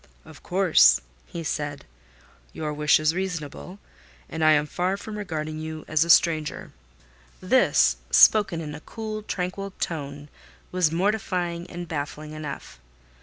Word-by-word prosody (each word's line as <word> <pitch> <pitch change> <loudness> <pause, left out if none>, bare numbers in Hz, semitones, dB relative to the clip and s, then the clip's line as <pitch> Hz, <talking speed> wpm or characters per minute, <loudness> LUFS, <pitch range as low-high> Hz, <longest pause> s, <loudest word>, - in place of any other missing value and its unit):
"Of 160 -2 -14
course," 185 -2 +5 0.3
he 170 - -6
said. 145 -2 -4 0.7
"Your 155 -1 -4
wish 150 0 +3
is 155 +1 +2
reasonable, 180 0 -5 0.5
and 160 0 -3
I 155 0 +6
am 150 0 +2
far 180 +5 -1
from 210 +1 -8
regarding 155 -6 -4
you 155 0 -6
as 155 0 +2
a 170 - -6
stranger." 160 -2 +3 0.7
This, 255 +8 +3
spoken 195 -6 +5
in 150 -2 -6
a 150 - -7
cool, 215 +4 -6
tranquil 195 0 -4
tone, 145 -3 -4 0.4
was 180 -4 +2
mortifying 180 -2 -1
and 175 0 -7
baffling 150 0 -5
enough. 150 - -8
165 Hz, 135 wpm, -25 LUFS, 155-185 Hz, 0.7 s, I